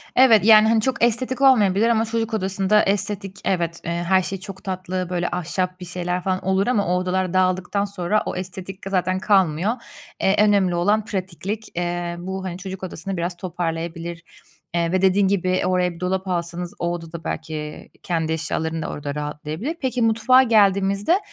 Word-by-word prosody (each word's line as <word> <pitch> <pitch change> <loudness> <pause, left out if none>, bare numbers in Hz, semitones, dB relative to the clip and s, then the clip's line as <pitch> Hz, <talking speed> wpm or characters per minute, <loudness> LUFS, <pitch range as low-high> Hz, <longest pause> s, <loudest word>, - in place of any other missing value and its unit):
Evet, 225 -6 +6
yani, 220 -1 +8
hani, 225 0 +3
çok 260 +1 -1
estetik 245 +2 +1
olmayabilir 225 -5 +5
ama 225 -1 +2
çocuk 225 0 -2
odasında 195 +1 +2
estetik 195 -1 -1
evet, 170 -3 -1
eee, 170 - -2
her 175 +2 +2
şey 195 +1 -4
çok 190 0 -9
tatlı, 185 -1 -3
böyle, 175 -1 -1
ahşap 180 +1 -2
bir 180 - -7
şeyler 180 +1 -3
falan 185 -1 -1
olur 190 +2 +1
ama 215 -5 +2
o 180 +1 +2
odalar 185 0 -1
dağıldıktan 185 +2 +1
sonra 200 +1 -1
o - - -3
estetik 185 +1 -7
de - - -4
zaten 185 -1 0
kalmıyor, 190 -2 +2 0.5
eee, 190 - +3
önemli 200 -4 +3
olan 205 +5 +2
pratiklik. 195 +2 -4
Eee, 175 0 -2
bu, 190 +2 -5
hani, 180 -1 -4
çocuk 190 0 -7
odasını 185 +1 -5
biraz 175 +1 -3
toparlayabilir, 170 -1 -4 0.5
eee, 170 -1 0
ve 185 0 +1
dediğin 190 +1 +4
gibi 185 -1 +1
oraya 180 -1 +1
bir 170 - -12
dolap 185 +1 -2
alsanız, 175 +1 -3
o 170 0 -1
odada 165 -1 -7
belki 155 -1 -5
kendi 160 -2 -1
eşyaların 160 0 -2
da - - -3
orada 145 -1 -5
rahatlayabilir. 150 - -4
Peki, 255 -2 -1
mutfağa 230 +3 +5
geldiğimizde, 200 - +3
185 Hz, 175 wpm, -22 LUFS, 175-205 Hz, 0.5 s, yani